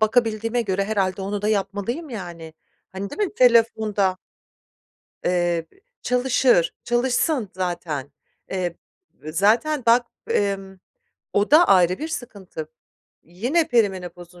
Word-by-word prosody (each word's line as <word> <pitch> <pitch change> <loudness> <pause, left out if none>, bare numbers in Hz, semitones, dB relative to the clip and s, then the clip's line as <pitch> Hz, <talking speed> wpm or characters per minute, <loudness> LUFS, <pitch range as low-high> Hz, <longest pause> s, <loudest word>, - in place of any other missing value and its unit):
bakabildiğime 225 +1 +1
göre 195 -1 -1
herhâlde 195 -2 -1
onu 200 +1 -3
da 210 - +1
yapmalıyım 210 - -2
yani. 170 -7 -8 0.4
Hani, 195 +1 -5
değil 425 - -3
mi - - -18
telefonda? 220 -5 +3 1.1
Eee, 175 -2 +1
b - - -25 0.3
çalışır, 250 -6 +2
çalışsın 245 - +1
zaten. 170 -6 -4 0.4
Eee, 180 -3 -2 0.6
zaten 230 - +2
bak, 235 +1 +5 0.2
emm, 195 -1 -1 0.5
o 205 +1 +1
da 310 +4 +8
ayrı 185 -1 +4
bir 315 - -4
sıkıntı. 200 - -7 0.5
Yine 245 - 0
perimenopozun 180 -6 -1
200 Hz, 110 wpm, -23 LUFS, 185-240 Hz, 1.1 s, da